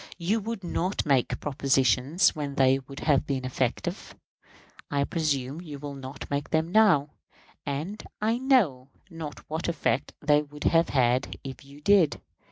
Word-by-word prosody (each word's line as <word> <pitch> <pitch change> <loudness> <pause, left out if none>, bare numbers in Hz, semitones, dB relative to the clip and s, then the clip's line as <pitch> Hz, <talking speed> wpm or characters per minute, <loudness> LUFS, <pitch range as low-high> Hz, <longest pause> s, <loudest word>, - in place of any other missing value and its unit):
You 195 +7 0
would 220 -1 -5
not 180 +2 -1
make 135 -4 +1
propositions 135 - +2
when 145 -2 -4
they 135 0 +4
would 135 +1 -10
have 145 -3 +2
been 135 -2 -2
effective. 130 - -2 0.7
I 140 -1 +1
presume 145 -2 -1
you 150 -5 -8
will 145 0 -7
not 135 0 -8
make 140 0 -2
them 160 +1 0
now; 180 -9 +4 0.6
and 155 +10 -3 0.2
I 225 +3 +1
know 195 - +2 0.2
not 160 -3 -8
what 160 +2 -3
effect 135 -6 -1
they 150 0 +3
would 150 0 -10
have 165 0 +3 0.5
if 135 0 -8
you 140 +1 -15
did. 185 -3 +4
145 Hz, 150 wpm, -27 LUFS, 135-170 Hz, 0.7 s, they